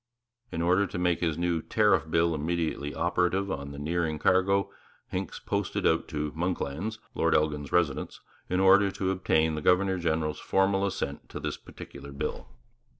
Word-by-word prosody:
In 85 - -2
order 95 +3 +3
to - - -6
make 90 -1 +1
his 80 -3 0
new 85 -1 0
Tariff 105 -6 +2
Bill 85 +1 +2
immediately 80 -2 -2
operative 90 +3 +1
on 70 -3 -4
the 70 - -8
nearing 80 +1 -1
cargo, 95 +4 +2 0.4
Hincks - - -4
posted - - -2
out 80 - +2
to 75 -1 -3
'Monklands,' 90 +4 -2 0.2
Lord 80 0 +2
Elgin's 75 -2 0
residence, 80 -6 0 0.3
in 90 - +1
order 100 +1 +6
to 95 0 -1
obtain 80 -4 +2
the 75 - -3
governor 95 +2 +3
general's 80 -2 -1
formal 95 +1 +2
assent 100 - -4
to - - -6
this - - -3
particular 70 - -11
bill. 70 - -4
85 Hz, 160 wpm, -28 LUFS, 80-95 Hz, 0.4 s, order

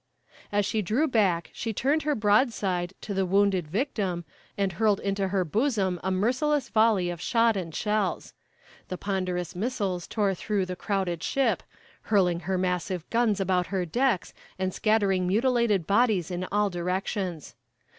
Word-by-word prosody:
"As 205 0 +2
she 215 +1 0
drew 225 - +1
back 195 - +1
she 225 -1 -3
turned 280 +9 +1
her 300 -1 0
broadside 205 -5 +1
to 205 - -5
the 195 0 +1
wounded 190 -2 +2
victim, 190 - -2 0.3
and 195 -2 0
hurled 210 +1 +2
into 195 -1 -1
her 190 -1 0
bosom 200 - 0
a 190 - 0
merciless 255 +10 +1
volley 215 -5 +3
of 175 -1 -7
shot 230 +1 +3
and 170 -5 -4
shells. 210 -2 -1 0.5
The 185 - -5
ponderous 185 -3 -2
missiles 195 -4 -2
tore 205 -3 0
through 195 +1 -1
the 180 0 -5
crowded 190 -4 -2
ship, 275 -1 +1 0.5
hurling 180 -5 +3
her 190 +2 -2
massive 180 -1 -2
guns 230 -3 +2
about 185 -2 +1
her 185 0 -1
decks, 235 +1 0 0.2
and 185 0 -1
scattering 200 -4 +2
mutilated 225 -2 +2
bodies 200 -3 +2
in 180 +1 -3
all 205 -1 +2
directions. 180 -1 -3
195 Hz, 155 wpm, -27 LUFS, 180-220 Hz, 0.5 s, volley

